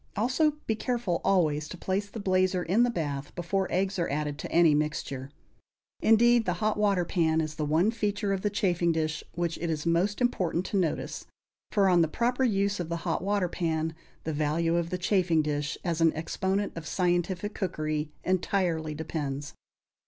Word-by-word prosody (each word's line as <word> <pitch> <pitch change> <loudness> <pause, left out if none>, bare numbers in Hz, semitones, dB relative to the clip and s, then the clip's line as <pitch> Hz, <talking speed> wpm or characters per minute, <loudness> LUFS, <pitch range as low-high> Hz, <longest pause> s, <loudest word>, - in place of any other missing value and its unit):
Also, 260 +8 +2
be 220 - +1
careful 230 -7 -1
always 155 -6 +2
to 185 - -7
place 195 +3 -2
the 225 - -7
blazer 185 -2 +1
in 190 +8 +2
the 245 - +4
bath 145 -9 -3
before 185 +2 -1
eggs 190 +1 0
are 170 - 0
added 150 0 -2
to - - -6
any 165 -2 +5
mixture. 145 -3 -2 0.7
Indeed, 235 +1 +5
the 180 - +1
hot 215 +3 +1
water 200 -4 +2
pan 160 -3 +1
is 155 -1 -2
the 150 0 -2
one 165 +8 +3
feature 205 -3 -1
of 190 - -2
the 210 - +1
chafing 180 -4 +1
dish 155 -1 -1
which 170 -1 -2
it 170 - -2
is 155 -1 -2
most 175 +5 +1
important 185 -8 0
to - - -4
notice; 175 -5 -2 0.4
for 200 -3 +3
on 175 -2 +5
the 165 - +3
proper 245 - 0
use 200 -4 +1
of 170 -2 -3
the 170 - -1
hot - - 0
water 200 -2 +1
pan 160 -2 -1 0.3
the 160 - -2
value 155 +3 +1
of 170 -1 0
the 180 - -2
chafing 175 -4 +2
dish 150 0 -2
as 170 -2 -1
an 165 -1 +5
exponent 190 +5 -1
of 165 -2 -6
scientific 180 +3 0
cookery 155 -4 -2
entirely 175 -4 0
depends. 145 -2 -4
175 Hz, 185 wpm, -28 LUFS, 160-200 Hz, 0.7 s, any